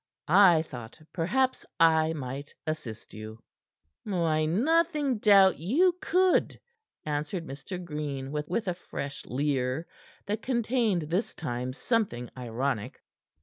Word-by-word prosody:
I 175 Hz, -2 st, +6 dB
thought 120 Hz, -7 st, -10 dB
perhaps 260 Hz, +10 st, +1 dB, 0.2 s
I 160 Hz, -1 st, +5 dB
might 140 Hz, -1 st, -6 dB
assist 150 Hz, -9 st, -5 dB
you." 110 Hz, +1 st, -9 dB, 0.6 s
"I 165 Hz, -5 st, +1 dB
nothing 295 Hz, -, +2 dB
doubt 195 Hz, -3 st, +6 dB
you 320 Hz, -, +3 dB
could," 370 Hz, +1 st, +2 dB, 0.5 s
answered 150 Hz, +4 st, -2 dB
Mr. 145 Hz, +6 st, -7 dB
Green 145 Hz, -4 st, -4 dB
with 150 Hz, +9 st, -2 dB
a 180 Hz, -, +1 dB
fresh 145 Hz, -5 st, -6 dB
leer, 135 Hz, +2 st, -1 dB, 0.4 s
that 210 Hz, +2 st, -2 dB
contained 235 Hz, -7 st, +1 dB
this 175 Hz, +8 st, -2 dB
time 125 Hz, -4 st, -3 dB
something 145 Hz, -, -1 dB
ironic. 125 Hz, -1 st, -3 dB
160 Hz, 110 wpm, -28 LUFS, 135-210 Hz, 0.6 s, I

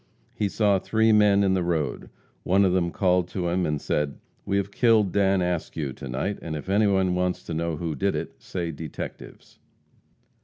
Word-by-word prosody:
He 105 Hz, -, -1 dB
saw 100 Hz, -2 st, +2 dB
three 110 Hz, +3 st, +2 dB
men 105 Hz, -2 st, +5 dB
in 95 Hz, -1 st, +2 dB
the 95 Hz, -, +1 dB
road. 80 Hz, -5 st, -2 dB, 0.3 s
One 95 Hz, +2 st, +3 dB
of 90 Hz, -, +2 dB
them 90 Hz, -2 st, +1 dB
called 90 Hz, -1 st, +1 dB
to 90 Hz, -1 st, -3 dB
him 90 Hz, +1 st, 0 dB
and 75 Hz, -1 st, -1 dB
said, 75 Hz, -1 st, -1 dB, 0.3 s
"We 100 Hz, -, +1 dB
have 100 Hz, 0 st, -2 dB
killed 110 Hz, -5 st, +3 dB
Dan 95 Hz, -1 st, +2 dB
Askew 80 Hz, -5 st, -3 dB
to 70 Hz, -, -9 dB
night, 65 Hz, +11 st, -3 dB
and 80 Hz, -2 st, -5 dB
if 75 Hz, +5 st, -7 dB
anyone 95 Hz, -2 st, +3 dB
wants 90 Hz, 0 st, -1 dB
to -, -, -6 dB
know 80 Hz, 0 st, -2 dB
who 80 Hz, 0 st, -3 dB
did 70 Hz, -, 0 dB
it, -, -, -6 dB
say 85 Hz, -3 st, -4 dB
detectives." 80 Hz, -1 st, -9 dB
90 Hz, 190 wpm, -25 LUFS, 80-100 Hz, 0.3 s, men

